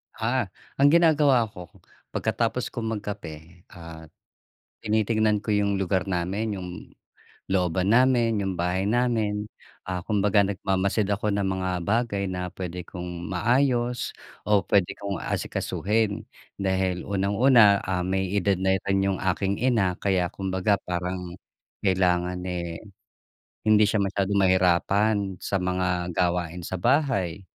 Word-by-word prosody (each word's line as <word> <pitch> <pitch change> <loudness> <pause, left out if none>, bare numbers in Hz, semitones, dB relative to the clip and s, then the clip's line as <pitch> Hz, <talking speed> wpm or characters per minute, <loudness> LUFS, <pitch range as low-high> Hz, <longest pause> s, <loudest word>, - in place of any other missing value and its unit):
Ah. 120 0 0 0.3
Ang 140 - +6
ginagawa 145 -8 +4
ko 90 -2 -10 0.5
pagkatapos - - -1
kong 115 -1 -3
magkape, 85 -4 -9
ah, 80 -2 -10 0.8
tinitignan 110 -1 +1
ko - - -6
yung 100 -1 +1
lugar 95 0 0
namin, 95 +4 -2
yung 90 -1 -6 0.8
looban 95 0 +1
namin, 120 -3 +3
yung 95 -1 -2
bahay 90 +2 0
namin, 110 -3 0 0.4
ah, 90 -1 -3
kumbaga 105 -1 +3
nagmamasid 95 +1 0
ako 105 +1 0
ng 100 -1 0
mga 95 -1 -2 0.2
bagay 110 -2 0
na 90 -1 -4
puwede 90 -1 -6
kong 90 -1 -7
maayos 120 +3 +1 0.3
o 105 -1 +3
puwede 100 -3 +2
kong 100 -1 -4
asikasuhin. 110 +1 -1 0.3
Dahil 95 -2 -1
unang-una, 100 +2 +4
ah, 90 -1 -1
may 95 0 -1
edad 100 -1 +1
na 95 0 +2
rin 95 0 +2
yung 95 -2 -1
aking 95 +1 0
ina 110 -8 +2
kaya 95 -3 +1
kumbaga 95 +1 0
parang 90 0 -4 0.5
kailangan, 90 -1 +1
eh, 85 -2 -4 0.9
hindi 105 0 +6
siya 105 0 +1
masyadong 100 +1 0
mahirapan 95 +2 +2
sa 100 - -3
mga 90 -1 -1
gawain 90 -1 0
sa - - -4
bahay, 100 - 0
95 Hz, 125 wpm, -25 LUFS, 90-105 Hz, 0.9 s, Ang